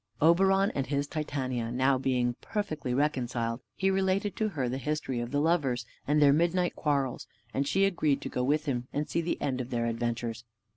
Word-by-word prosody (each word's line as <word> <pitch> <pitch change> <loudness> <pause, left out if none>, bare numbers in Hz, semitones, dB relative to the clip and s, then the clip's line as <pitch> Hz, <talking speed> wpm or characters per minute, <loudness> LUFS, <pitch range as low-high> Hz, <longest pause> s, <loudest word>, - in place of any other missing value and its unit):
Oberon 195 +5 +4
and 135 -1 -2
his 140 0 0
Titania 135 -6 -2 0.4
being 125 -2 +1
now 120 - -4
perfectly 155 - -3
reconciled, 125 -4 0
he 195 0 +1
related 190 +2 +1
to 215 -1 +1
her 140 -9 -2
the 130 +2 -2
history 135 -2 -2
of 120 0 -3
the 145 +2 0
lovers, 145 -7 +1 0.2
and 150 +1 +3
their 145 -2 +6
midnight 175 +3 +1
quarrels; 140 -4 -1 0.3
and 140 +1 0
she 195 +6 +3
agreed 155 -7 +1
to - - -4
go 125 - -1
with 150 +4 +1
him 125 -4 -2
and 150 +1 -2
see 170 - 0
the 170 - -2
end 130 -2 -1
of 125 - -6
their 120 -2 -1
adventures. 115 0 -2
140 Hz, 195 wpm, -29 LUFS, 125-170 Hz, 0.4 s, their